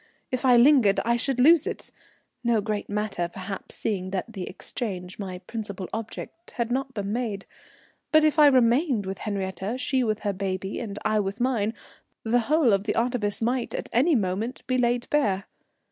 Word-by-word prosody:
If 255 +1 -1
I 250 -2 +6
lingered 240 -6 +5
I 235 +1 +3
should 255 +1 -1
lose 320 +4 +6
it, - - -5 0.5
no 235 -2 +3
great 210 0 -3
matter 205 -4 -2
perhaps, 190 +1 -6
seeing 190 -4 -2
that 195 +4 -4
the 190 -4 -5
exchange, 185 -3 -6
my 185 -3 -5
principal 200 -5 -5
object, 225 +9 -7
had 235 -1 -1
not 265 +1 -2
been 205 -1 -2
made; 220 -5 -3 0.7
but 310 0 +6
if 310 0 +3
I 300 - +9
remained 255 - +3
with 190 0 -5
Henriette, 195 +2 -3
she 260 0 +1
with 215 -2 -1
her 205 -1 -1
baby 190 0 -3
and 205 -4 -5
I 215 - +2
with 200 +2 -3
mine, 235 -3 0 0.5
the 235 +2 +2
whole 305 -8 +4
of 195 +1 +1
the 215 - -1
artifice 230 -3 0
might 245 +1 -1
at - - -5
any 280 +7 +4
moment 210 +3 -2
be 255 0 0
laid 240 0 +1
bare. 205 -10 +1
225 Hz, 180 wpm, -26 LUFS, 200-250 Hz, 0.7 s, I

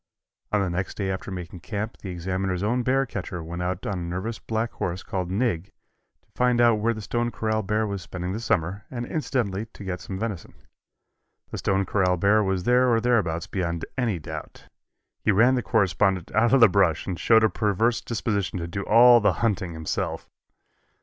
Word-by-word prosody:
On 105 - +2
the 95 - 0
next 90 +2 -3
day 95 -2 -1
after 95 +2 -5
making 90 -1 -7
camp 105 +5 -5
the 95 - -8
Examiner's 95 +1 -2
own 120 +4 +1
bear 135 +2 +2
catcher 90 -7 -5
went 85 +2 -6
out 90 +1 -3
on 100 -3 -2
a - - -5
nervous 90 +7 -4
black 115 +1 -2
horse 90 +2 -4
called 90 -2 -3
"Nig" 95 -4 0 0.6
to - - -37
find 125 -1 +2
out 120 -2 +5
where 115 +2 +1
the 110 - -7
Stone 120 +3 -1
Corral 110 -2 -1
bear 105 +2 0
was 100 -2 -4
spending 90 0 -5
the 110 - -3
summer 100 -3 -1
and 120 -2 -4
incidentally 115 -9 -2
to 105 - -12
get 90 -2 -4
some 95 - -6
venison. 105 -5 -5 1.0
The - - -4
Stone 95 0 +1
Corral 90 -1 +1
bear 100 +4 +4
was 95 -2 -1
there 125 +3 +4
or 115 - +4
thereabouts 95 -9 +1
beyond 85 -3 -3
any 120 -7 0
doubt. 75 - -8 0.6
He - - +4
ran 115 +6 +5
the 125 - +1
correspondent 95 -5 +1
out 110 +2 +3
of 135 -1 +5
the 115 - +10
brush 90 -5 +2
and 90 -3 -4
showed 110 -1 +5
a - - +6
perverse 110 +2 +1
disposition 105 -5 -2
to 85 - -3
do 100 +4 -4
all 120 +4 +7
the 105 - +3
hunting 95 -6 -1
himself. 80 -1 -3
100 Hz, 195 wpm, -25 LUFS, 90-115 Hz, 1.0 s, the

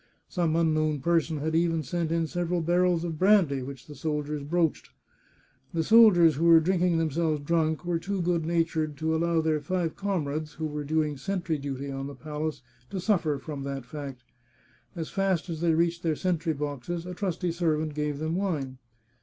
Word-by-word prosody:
Some 170 -4 0
unknown 155 -2 +2
person 165 0 +1
had 155 +2 -2
even 165 -1 +2
sent 165 +4 -2
in 165 0 +1
several 175 +1 -1
barrels 175 0 +2
of 165 -3 -4
brandy, 185 -9 +4
which 130 0 -8
the 150 - -10
soldiers 150 +1 -3
broached. 165 +2 0 0.9
The 165 - +1
soldiers 180 - +6
who 165 - +1
were 165 -1 +8
drinking 180 0 +2
themselves 160 -1 0
drunk 160 +1 0
were 175 -1 0
too 195 +3 -3
good 170 -1 +1
natured 160 -2 0
to 160 +2 0
allow 165 0 +2
their 155 -1 0
five 170 +1 -1
comrades, 155 -6 -2
who 160 - -4
were 150 -1 -3
doing 150 0 0
sentry 170 +1 -2
duty 140 0 -4
on 135 0 -4
the 140 - -8
palace, 150 -2 -4 0.3
to 195 - -4
suffer 175 -7 +1
from 140 +1 -6
that 135 -2 -5
fact. 135 -2 -7 0.7
As 165 -2 -4
fast 190 -3 0
as 160 -1 -5
they 165 -2 +3
reached 170 +1 +1
their 160 -3 0
sentry 170 -1 0
boxes 150 +3 -4
a 180 - -5
trusty 180 -2 -2
servant 160 -3 0
gave 150 -1 -2
them 160 +2 -2
wine. 150 -9 -2
160 Hz, 180 wpm, -27 LUFS, 150-175 Hz, 0.9 s, were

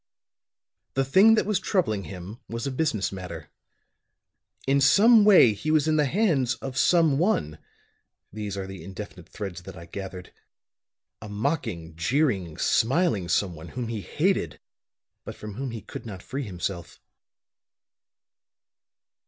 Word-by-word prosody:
"The 135 0 +2
thing 195 +11 +6
that - - +1
was 210 -1 +1
troubling 110 - 0
him 95 +5 -9
was 115 0 -4
a 140 - -2
business 130 -7 -1
matter. 95 -2 -8 1.1
In 140 +1 +2
some 215 - +6
way 190 - +7
he 105 +10 -5
was 155 0 +3
in 155 - +2
the 150 -2 +3
hands 145 - +1
of 135 -1 -7
some 160 -1 +3
one 80 - 0 0.7
these 105 -2 -5
are 95 - -3
the 95 -3 -9
indefinite 95 -1 -9
threads 95 -5 -6
that 95 +1 -11
I 85 - -10
gathered 95 0 -8 0.9
a 105 - -8
mocking, 105 - -3
jeering, 95 - 0
smiling 120 - +1
someone 85 -2 -1
whom 120 +4 -5
he 110 -3 -3
hated, 150 - -1 0.6
but - - -8
from 105 -1 -8
whom 130 +5 -4
he 115 -2 -6
could 110 - -9
not 95 -4 -8
free 135 0 -4
himself. 90 -2 -5
110 Hz, 140 wpm, -26 LUFS, 95-145 Hz, 1.1 s, way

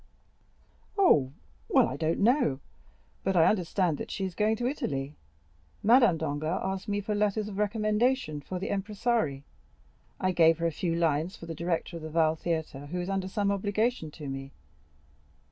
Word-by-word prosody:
"Oh, 145 - +4 0.4
well, - - +5
I 130 - -4
don't 160 +5 -1
know; 220 - +3 0.6
but 190 0 0
I 165 -2 +6
understand 180 -4 +1
that - - -5
she 195 - -3
is 185 - -4
going 215 +5 +2
to 240 - -3
Italy. 145 - -2 0.7
Madame 235 -5 +5
Danglars 155 +3 -2
asked 190 +2 -3
me 205 0 -1
for 210 +1 -2
letters 210 0 0
of 205 -1 -6
recommendation 215 - +1
for 185 +5 -5
the 190 +3 -4
impresari; 200 - -1 0.8
I 185 - +1
gave 165 -2 +5
her 170 - -2
a 165 - +2
few 165 +2 -2
lines 165 +2 0
for 165 - -10
the 165 - -5
director 170 +1 -2
of - - -9
the 155 - -6
Valle 160 0 +2
Theatre, 160 -4 -3
who 180 +4 -4
is 180 +2 -3
under 195 -1 -1
some 200 +1 0
obligation 205 -1 0
to 150 -1 -9
me. 135 0 -6
180 Hz, 175 wpm, -29 LUFS, 160-210 Hz, 0.8 s, I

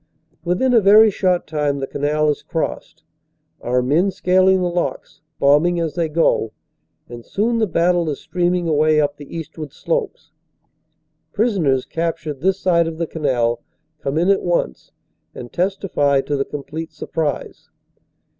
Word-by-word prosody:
Within 185 +9 +1
a 230 - +6
very 210 +2 +7
short 185 -2 0
time 150 -2 -1
the 135 - -3
canal 150 +2 0
is 145 - -5
crossed, - - -4 0.6
our 125 +1 0
men 160 +10 +2
scal 185 0 +3
ing 190 - +3
the - - +1
locks, 175 0 -4 0.2
bombing 150 +5 +3
as 165 -2 -2
they 170 -2 -1
go, 150 -8 +1 0.5
and 120 -1 -10
soon 230 - -1
the 220 - +2
battle 170 -1 +1
is 145 - -4
stream 180 0 0
ing 175 -1 -2
away 155 0 +3
up 145 -1 0
the 145 +3 -9
eastward 160 -2 -7
slopes. - - -3 1.0
Prisoners, 185 - +1
captured 160 -4 -3
this 190 +2 +2
side 170 -3 +2
of 165 -1 -5
the 170 - -1
canal, 120 -7 -1 0.4
come 140 +1 -3
in 175 +4 +3
at 200 - +2
once 170 - -2 0.4
and 120 - -9
testify 175 -7 +1
to 145 - -3
the 135 -1 -1
complete 155 +3 -6
sur - - -8
prise. 155 -3 -4
165 Hz, 160 wpm, -20 LUFS, 145-180 Hz, 1.0 s, very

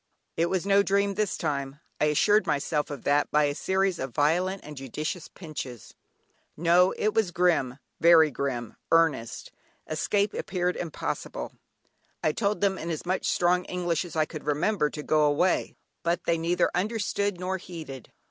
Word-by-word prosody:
It 165 - +2
was 185 0 -1
no 200 0 +5
dream 200 0 +1
this 210 -1 -1
time 140 -2 -3 0.2
I - - +3
assured 205 +8 +3
myself 150 +1 0
of 145 -4 -7
that 145 +1 +2
by 150 0 +3
a 145 -1 +1
series 190 +3 0
of 130 -3 -5
violent 180 +6 +1
and 150 0 -9
judicious 150 +6 -5
pinches; 135 - -8 0.6
no! 175 +3 +4
it 215 0 +1
was 220 -5 +2
grim, 170 -8 +1 0.2
very 165 -2 +6
grim, 125 -5 -3
earnest. 160 -9 +1 0.3
Escape 200 +6 0
appeared 180 -1 -1
impossible. 165 -4 -4 0.7
I 155 - +3
told 205 +5 -1
them 195 -2 +1
in 165 - -5
as 160 0 -4
much 185 +1 0
strong 180 +1 +2
English 175 -2 -1
as 175 -2 -9
I 155 -1 +3
could 155 -1 -8
remember, 150 +2 +1
to 150 - -7
go 155 0 +3
away, 150 +5 +1 0.3
but 170 +1 0
they 165 -1 +1
neither 170 +2 +1
understood 205 -1 -1
nor 185 +1 -2
heeded. 155 -9 -9
170 Hz, 165 wpm, -27 LUFS, 150-185 Hz, 0.7 s, very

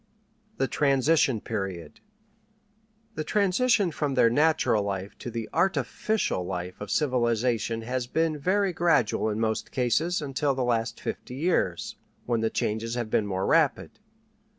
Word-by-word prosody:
THE 135 - +1
TRANSITION 140 -4 +2
PERIOD 95 -6 -5 1.1
The 155 - -3
transition 200 +2 +2
from 145 -3 -2
their 115 -3 +4
natural 150 -6 +2
life 100 0 -4
to - - -6
the 115 -1 -4
artificial 195 - 0
life 90 +1 -5
of 105 - -6
civilization 120 -4 0
has 125 +1 -3
been 160 +2 0
very 190 +4 +1
gradual 165 -11 +2
in 105 0 -2
most 110 -1 -1
cases, 150 +8 +1
until 140 -1 -1
the 130 - -1
last 115 -1 -1
fifty 125 - -6
years, 135 - -1 0.3
when 120 -2 0
the 110 - +1
changes 110 +3 -2
have 120 -3 -3
been 105 - +1
more 95 -1 -2
rapid. 160 +3 +1
125 Hz, 140 wpm, -27 LUFS, 110-155 Hz, 1.1 s, their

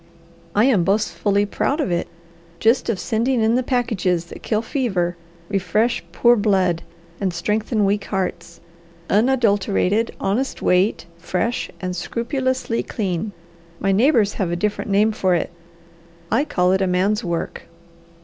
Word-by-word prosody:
I 210 +3 +5
am 230 -10 +4
boastfully 205 +1 +1
proud 275 +8 -1
of 285 - 0
it 175 0 -1 0.5
just 230 +3 +2
of 210 -5 0
sending 230 +4 0
in 220 +1 +3
the 250 - +2
packages 220 -9 0
that - - -11
kill 220 0 -1
fever, 195 - -1 0.3
refresh 210 +4 0
poor 240 0 +4
blood, 190 -6 +2 0.4
and 195 -2 0
strengthen 210 +5 0
weak 200 +1 0
hearts; 180 -3 -4 0.5
unadulterated, 210 -2 +2
honest 230 +8 -1
weight, 180 +4 +2
fresh, 185 +7 -2
and 185 -2 -3
scrupulously 255 - -1
clean. 195 -1 -3 0.5
My 195 - +1
neighbours 220 -1 +3
have 185 - 0
a 175 - -1
different 210 +3 -2
name 205 +2 +3
for 185 -4 +1
it; 170 - -2 0.8
I 285 - +2
call 180 -9 +1
it 190 0 +2
a 190 - +2
man's 195 +5 +1
work." 170 -2 -3
205 Hz, 140 wpm, -21 LUFS, 185-230 Hz, 0.8 s, I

